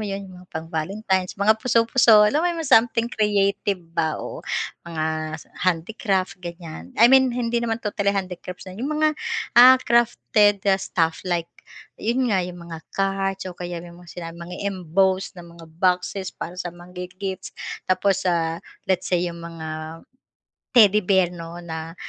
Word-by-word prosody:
'yon, 200 -2 -4 0.2
pang 160 0 -5
Valentine's 185 +3 -1
mga 215 +2 +3
puso-puso 230 -2 +5
alam 250 +9 +2
mo 350 - +1
yung 345 - -2
mga 270 - -2
something 230 0 +5
creative 205 -3 +1 0.2
ba 160 -2 0
oo, - - -7 0.5
mga 155 -1 -2
s 160 - -13 0.2
handicrafts 185 +1 -1
ganyan 170 - -8
I 225 - +6
mean 265 -1 +7
hindi 235 -1 0
naman 230 -1 -2
totally 200 -1 -1
handicrafts, 180 -1 -5
ah, 185 - -9
'yong 235 +9 -4
mga, 305 0 +2 0.5
ah, 255 +1 +10
crafted, 215 -4 +3
ah, 195 -1 +3
stuff 165 -3 0
like 170 -1 -1 0.5
'yon 240 +1 +1
nga, 190 - +3
'yong 180 0 -5
mga 165 -1 -7 0.2
cards 195 -1 -1
o 185 - -5
kaya 175 0 -6
yung 175 0 -12
mga 175 - -16
sinabing 170 -1 -8
mga 180 - -7 0.2
embosed 185 +1 0
na 175 - -9
mga 170 -1 -14
boxes 185 +1 0
para 175 - -7
sa 175 -1 -4
mang-gifts, 180 +2 -7 0.3
tapos 190 +1 +1
sa 165 -2 +1 0.3
let's 190 -2 +1
say 180 -2 +1
'yong 175 -1 -3
mga 160 -1 -7 0.7
Teddy 210 -4 +6
Bear 190 -3 +3
no 170 0 -8
na 160 -1 -6
185 Hz, 160 wpm, -23 LUFS, 170-210 Hz, 0.7 s, ah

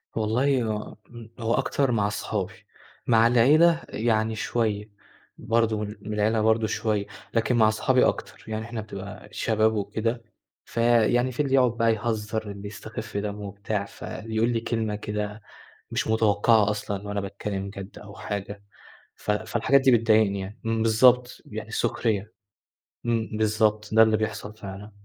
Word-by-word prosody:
والله 125 +4 +1
هو 110 -1 -4 0.4
هو 115 0 0
أكتر 135 +1 +1
مع 105 -3 +2
أصحابي. 105 0 -3 0.5
مع 115 -1 +5
العيلة 155 +8 +5
يعني 110 0 0
شوية، 110 -2 -1 0.5
برضه 115 -1 +1
من 105 0 -4
من 105 +1 -5
العيلة 110 +1 +1
برضه 110 0 +3
شوية. 105 -1 -1 0.3
لكن 115 +2 +1
مع 110 -2 +5
أصحابي 125 +4 +3
أكتر - - -4
يعني 110 0 -4
إحنا 115 -1 -5
بتبقى 100 -1 -8
الشباب 110 0 +1
وكده، 110 +3 -2 0.4
فيعني 120 +1 +2
في 120 - -13
اللي 135 -2 -1
يقعد 125 -2 +4
بقى 115 -1 +3
يهزر، 110 -1 -3
اللي 100 0 -8
يستخف 110 +1 -7
دمه 105 0 -3
وبتاع، 100 +1 -3
فاللي 110 +2 -7
يقول 115 +2 +2
لي 120 -1 +1
كلمة 110 -3 -1
كده 105 0 -4 0.5
مش - - -1
متوقعة 110 -1 +3
أصلًا 105 -1 -4
وأنا 100 0 -2
باتكلم 100 0 -4
جد 100 0 -9
أو 100 -1 -12
حاجة. 100 0 -5 0.5
ف - - -5
فالحاجات 115 +6 +2
دي 135 0 +4
بتضايقني 110 -4 +3
يعني 100 +4 -8
إمم، 115 0 0
بالضبط، 120 +2 +4
يعني - - -7
سخرية. 110 -1 -1 0.7
إمم، 115 -1 0
بالضبط، 110 -1 +1
ده 110 0 +8
اللي 110 -1 +3
بيحصل 105 -1 -4
فعلًا. 100 +1 -8
110 Hz, 150 wpm, -25 LUFS, 105-115 Hz, 0.7 s, ده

